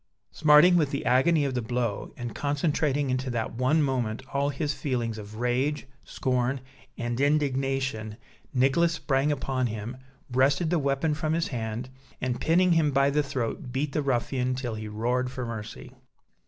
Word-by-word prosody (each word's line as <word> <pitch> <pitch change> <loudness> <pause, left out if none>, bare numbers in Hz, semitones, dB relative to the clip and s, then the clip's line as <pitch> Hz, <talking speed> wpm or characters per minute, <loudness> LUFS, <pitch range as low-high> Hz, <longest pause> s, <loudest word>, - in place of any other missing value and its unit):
Smarting 155 +4 +6
with 150 -4 +2
the 140 - -3
agony 145 +4 +4
of 135 - -1
the 125 - -1
blow, 120 -2 -2
and 120 -2 -5
concentrating 145 -1 0
into 130 +1 -1
that 115 -2 -2
one 130 +6 +2
moment 125 -4 -1
all 140 +1 +1
his 145 +1 -2
feelings 120 -6 -2
of 105 0 -9
rage, 125 +6 0 0.2
scorn, 130 +1 -1 0.4
and 120 +2 -2
indignation, 135 -6 0 0.3
Nicholas 135 +6 +3
sprang 140 -2 +1
upon 130 -3 -1
him, 110 +2 -5 0.4
wrested 140 +6 +2
the 175 - +3
weapon 140 +2 +1
from 155 +1 -1
his 165 0 0
hand, 115 -1 -4 0.3
and 125 -1 -2
pinning 180 +3 +3
him 165 -3 +4
by 140 0 +3
the 150 +1 +2
throat 130 -3 -3
beat 140 +3 -1
the 150 - 0
ruffian 130 -1 0
till 125 -3 -3
he 110 0 -5
roared 120 +4 -1
for 130 -1 -5
mercy. 115 +2 -7
130 Hz, 165 wpm, -27 LUFS, 120-145 Hz, 0.4 s, Smarting